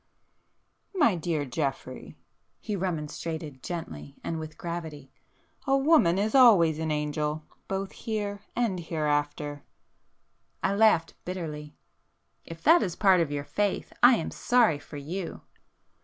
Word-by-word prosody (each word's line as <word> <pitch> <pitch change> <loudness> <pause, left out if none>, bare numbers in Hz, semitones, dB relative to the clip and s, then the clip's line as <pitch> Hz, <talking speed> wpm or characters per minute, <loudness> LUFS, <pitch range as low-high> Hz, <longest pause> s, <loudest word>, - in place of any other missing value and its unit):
"My 295 - +4
dear 160 -3 -2
Geoffrey!" 135 -1 -4 0.4
he 210 - -4
remonstrated 160 -5 -4
gently 80 - -7
and 165 - -3
with 155 -1 -8
gravity—"A 160 - -5
woman 270 - +4
is 210 +2 0
always 190 - +6
an 160 0 -2
angel,—both 150 +5 -3
here 205 -2 -4 0.2
and 225 -7 0
hereafter!" 145 -2 -2 1.0
I 195 - +2
laughed 200 -6 +3
bitterly. 155 -5 -6 0.7
"If 165 0 -10
that 335 +3 +6
is 180 -4 -2
part 190 -4 +4
of 155 -3 -1
your 145 0 -3
faith 205 +3 -2
I 245 +1 +8
am 165 - -3
sorry 235 -12 +2
for 145 - -10
you!" 165 +6 -5
165 Hz, 120 wpm, -27 LUFS, 150-200 Hz, 1.0 s, I